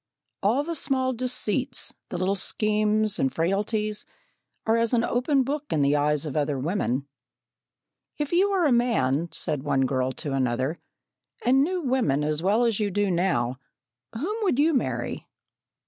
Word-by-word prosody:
All 230 Hz, +8 st, +2 dB
the 335 Hz, +3 st, -3 dB
small 260 Hz, -3 st, 0 dB
deceits, 250 Hz, +1 st, -1 dB, 0.2 s
the 180 Hz, -, -4 dB
little 185 Hz, +2 st, +1 dB
schemes 215 Hz, +1 st, +1 dB
and 135 Hz, -, +1 dB
frailties, 210 Hz, +5 st, -1 dB, 0.6 s
are 225 Hz, -, +3 dB
as 230 Hz, +1 st, +2 dB
an 230 Hz, -, +2 dB
open 260 Hz, +3 st, +1 dB
book 290 Hz, +3 st, -3 dB
in 150 Hz, -, +2 dB
the 140 Hz, +1 st, +3 dB
eyes 150 Hz, +1 st, +1 dB
of 145 Hz, -, -5 dB
other 145 Hz, -2 st, 0 dB
women. 140 Hz, -3 st, -1 dB, 1.1 s
"If 295 Hz, -1 st, -3 dB
you 370 Hz, +4 st, +3 dB
were 380 Hz, -4 st, +2 dB
a 290 Hz, -, +3 dB
man," 170 Hz, -, +2 dB
said 150 Hz, -5 st, -2 dB
one 140 Hz, -1 st, +1 dB
girl 130 Hz, 0 st, 0 dB
to 140 Hz, 0 st, -4 dB
another, 130 Hz, +3 st, 0 dB, 0.7 s
"and 265 Hz, +3 st, +5 dB
knew 360 Hz, +3 st, -1 dB
women 250 Hz, -, +1 dB
as 150 Hz, +1 st, 0 dB
well 210 Hz, +6 st, +3 dB
as 225 Hz, -3 st, +1 dB
you 210 Hz, -1 st, +1 dB
do 200 Hz, 0 st, 0 dB
now, 130 Hz, -9 st, 0 dB, 0.5 s
whom 325 Hz, -, -3 dB
would 375 Hz, -, +1 dB
you 315 Hz, +3 st, +3 dB
marry?" 260 Hz, -, -2 dB
210 Hz, 160 wpm, -25 LUFS, -, 1.1 s, and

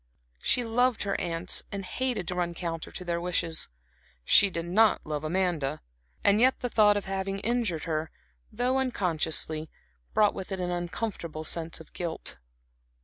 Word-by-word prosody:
She 245 Hz, -, +2 dB
loved 245 Hz, +1 st, +2 dB
her 200 Hz, -1 st, -1 dB
aunts, 170 Hz, 0 st, 0 dB
and 195 Hz, -1 st, -4 dB
hated 245 Hz, -6 st, -1 dB
to -, -, -2 dB
run 175 Hz, -1 st, -1 dB
counter 165 Hz, -2 st, -4 dB
to 180 Hz, -, -7 dB
their 170 Hz, -1 st, -1 dB
wishes; 170 Hz, -2 st, 0 dB, 0.6 s
she 200 Hz, -, +6 dB
did 170 Hz, -2 st, -3 dB
not 210 Hz, +5 st, +4 dB
love 150 Hz, -1 st, -3 dB
Amanda, 160 Hz, -4 st, 0 dB, 0.4 s
and 200 Hz, +1 st, +5 dB
yet 260 Hz, +1 st, +4 dB
the 245 Hz, -, -1 dB
thought 210 Hz, -2 st, +5 dB
of 205 Hz, -, -3 dB
having 195 Hz, 0 st, -2 dB
injured 225 Hz, -8 st, 0 dB
her, 155 Hz, -1 st, -2 dB, 0.4 s
though 250 Hz, +3 st, +1 dB
unconsciously, 160 Hz, -9 st, 0 dB, 0.5 s
brought 210 Hz, -1 st, +5 dB
with 190 Hz, -, -7 dB
it 190 Hz, -, -2 dB
an 180 Hz, -1 st, -1 dB
uncomfortable 175 Hz, -2 st, -3 dB
sense 165 Hz, +1 st, -1 dB
of 160 Hz, -, -14 dB
guilt. 170 Hz, -, -5 dB
180 Hz, 160 wpm, -28 LUFS, 165-210 Hz, 0.6 s, she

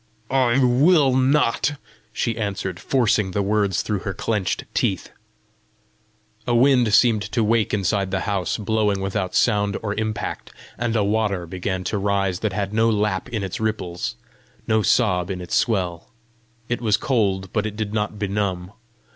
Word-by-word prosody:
"I 130 Hz, -2 st, +3 dB
will 135 Hz, +2 st, +4 dB
not," 135 Hz, +1 st, +2 dB, 0.4 s
she 115 Hz, +1 st, -1 dB
answered, 100 Hz, -4 st, -3 dB
forcing 115 Hz, -6 st, +1 dB
the 100 Hz, +2 st, -1 dB
words 100 Hz, -2 st, +1 dB
through 105 Hz, -2 st, -2 dB
her 95 Hz, -2 st, -5 dB
clenched 105 Hz, -5 st, -1 dB
teeth. -, -, -1 dB, 1.4 s
A 120 Hz, -, +2 dB
wind 125 Hz, -2 st, +4 dB
seemed 110 Hz, -1 st, +4 dB
to 115 Hz, -, +2 dB
wake 110 Hz, 0 st, +2 dB
inside 100 Hz, -1 st, 0 dB
the 95 Hz, 0 st, -1 dB
house, 100 Hz, -5 st, -1 dB
blowing 105 Hz, -1 st, 0 dB
without 95 Hz, -1 st, -2 dB
sound 105 Hz, -3 st, +2 dB
or 105 Hz, -2 st, -1 dB
impact; 110 Hz, 0 st, -4 dB, 0.2 s
and 115 Hz, 0 st, -2 dB
a 105 Hz, -, +2 dB
water 100 Hz, -3 st, 0 dB
began 95 Hz, +2 st, -3 dB
to 105 Hz, -, -2 dB
rise 100 Hz, -2 st, 0 dB
that 110 Hz, -, -1 dB
had 100 Hz, 0 st, -2 dB
no 115 Hz, +1 st, +3 dB
lap 105 Hz, 0 st, 0 dB
in 110 Hz, -5 st, -3 dB
its 95 Hz, -, -4 dB
ripples, 105 Hz, -6 st, -3 dB, 0.5 s
no 110 Hz, -1 st, +2 dB
sob 95 Hz, -6 st, +2 dB
in 95 Hz, -2 st, -3 dB
its 90 Hz, -1 st, -7 dB
swell. 90 Hz, -7 st, 0 dB, 0.6 s
It 120 Hz, -, -2 dB
was 110 Hz, -3 st, +2 dB
cold, 100 Hz, -9 st, 0 dB
but 110 Hz, -1 st, 0 dB
it 105 Hz, -, -7 dB
did 105 Hz, -1 st, -4 dB
not 105 Hz, -1 st, -2 dB
benumb. 100 Hz, -3 st, -2 dB
105 Hz, 160 wpm, -22 LUFS, 95-115 Hz, 1.4 s, will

